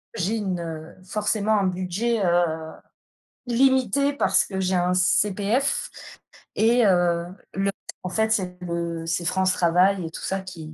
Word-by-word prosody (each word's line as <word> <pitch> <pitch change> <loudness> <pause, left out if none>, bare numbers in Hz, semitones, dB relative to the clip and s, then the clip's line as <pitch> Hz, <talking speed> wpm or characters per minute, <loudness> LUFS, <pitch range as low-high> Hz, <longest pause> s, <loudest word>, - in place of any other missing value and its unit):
j'ai 210 +2 -1
une, 190 -4 -2
heu, 160 -1 -7
forcément, 210 +2 0
un 195 - +1
budget, 185 +5 -1
heu, 165 -2 +1 0.8
limité 265 +2 +2
parce 285 - +2
que 190 -2 -5
j'ai 190 0 0
un 180 0 +2
CPF 205 +7 +1 0.7
et 235 +2 +4
heu, 175 -3 +2 0.3
le 195 +1 0 0.3
en 185 - -3
fait, 220 +4 0
c'est 185 -5 -1
le 170 -1 -3
c'est 165 +1 -2
France 185 +1 +1
Travail 180 +2 +2
et - - -4
tout - - -8
ça 195 0 -2
qui 165 -5 -9
185 Hz, 150 wpm, -24 LUFS, 175-215 Hz, 0.8 s, et